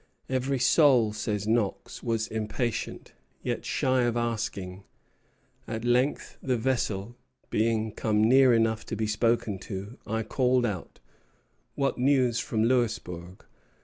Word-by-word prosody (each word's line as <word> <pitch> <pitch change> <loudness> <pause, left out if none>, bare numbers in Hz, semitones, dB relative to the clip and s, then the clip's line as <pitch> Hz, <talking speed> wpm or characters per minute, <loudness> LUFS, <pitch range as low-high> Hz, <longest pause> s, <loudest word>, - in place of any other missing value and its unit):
"Every 130 +1 0
soul," 125 -4 +4
says 105 -1 -3
Knox, 110 -3 -1
"was 115 -2 -1
impatient, 110 +2 -3 0.3
yet - - -3
shy 130 -1 +1
of 120 0 0
asking; 105 -5 -3 0.8
at 110 0 -4
length, 125 +4 0
the 130 -2 0
vessel 115 -3 -1 0.4
being 110 0 +1
come 105 0 +1
near 130 +3 +6
enough 115 -1 +2
to - - -3
be 110 0 -1
spoken 110 -2 0
to, 100 +4 -7
I 110 +1 -1
called 125 +2 +2
out, 100 -6 -5 0.8
'What 140 -2 0
news 125 -3 +3
from 110 -1 -1
Louisbourg?' 105 -7 -1
115 Hz, 125 wpm, -27 LUFS, 105-125 Hz, 0.8 s, near